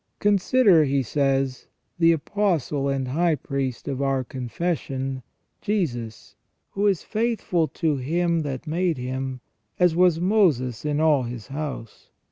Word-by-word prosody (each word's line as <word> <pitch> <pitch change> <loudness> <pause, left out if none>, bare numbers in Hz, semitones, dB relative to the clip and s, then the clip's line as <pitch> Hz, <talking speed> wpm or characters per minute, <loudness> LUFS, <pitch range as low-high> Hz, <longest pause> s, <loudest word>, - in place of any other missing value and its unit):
" - - -49
Consider," 200 -3 +4
he 135 -1 +1
says, 135 0 0
" - - -43
the 165 -1 +6
Apostle 160 -5 0
and 135 -2 -1
High 165 +4 +2
Priest 135 -3 -4
of 135 -1 -2
our 135 -1 +1
confession, 135 +1 -3 0.4
Jesus, 120 - -3 0.4
who 200 +1 +1
is 195 -5 +1
faithful 215 -7 0
to 155 -3 -1
Him 170 +5 0
that 140 -2 -4
made 170 0 0
Him, 130 0 -4 0.4
as 180 -2 +3
was 175 -2 +4
Moses 155 - +2
in 150 0 0
all 155 -3 +4
his 120 -3 -7
house. 140 -6 -6
145 Hz, 140 wpm, -24 LUFS, 130-175 Hz, 0.4 s, the